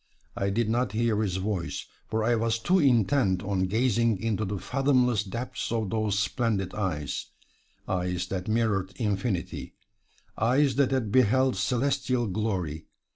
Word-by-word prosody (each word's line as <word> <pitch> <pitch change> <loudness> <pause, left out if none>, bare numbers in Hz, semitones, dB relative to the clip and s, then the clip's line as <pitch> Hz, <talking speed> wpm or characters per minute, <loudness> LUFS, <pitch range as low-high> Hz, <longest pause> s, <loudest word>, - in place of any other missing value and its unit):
I 100 - 0
did 110 +3 0
not 115 -1 0
hear 110 -1 +1
his 95 -4 -1
voice, 95 -2 -3 0.2
for 110 0 -1
I 120 +2 +3
was 115 0 +1
too 180 +11 +2
intent 115 - +3
on 95 -2 0
gazing 115 +1 +2
into 110 0 -1
the 100 +1 -3
fathomless 125 -2 +2
depths 115 +5 -5
of 110 -5 -1
those 110 -2 0
splendid 105 -3 0
eyes 85 -9 -3 0.6
eyes 90 -1 -1
that 95 -1 -3
mirrored 110 -4 0
infinity, 100 -4 -2 0.6
eyes 130 +4 +3
that 140 -2 +4
had 130 -6 -1
beheld 130 +1 +3
celestial 125 +4 0
glory. 90 -7 -2
110 Hz, 140 wpm, -27 LUFS, 95-120 Hz, 0.6 s, that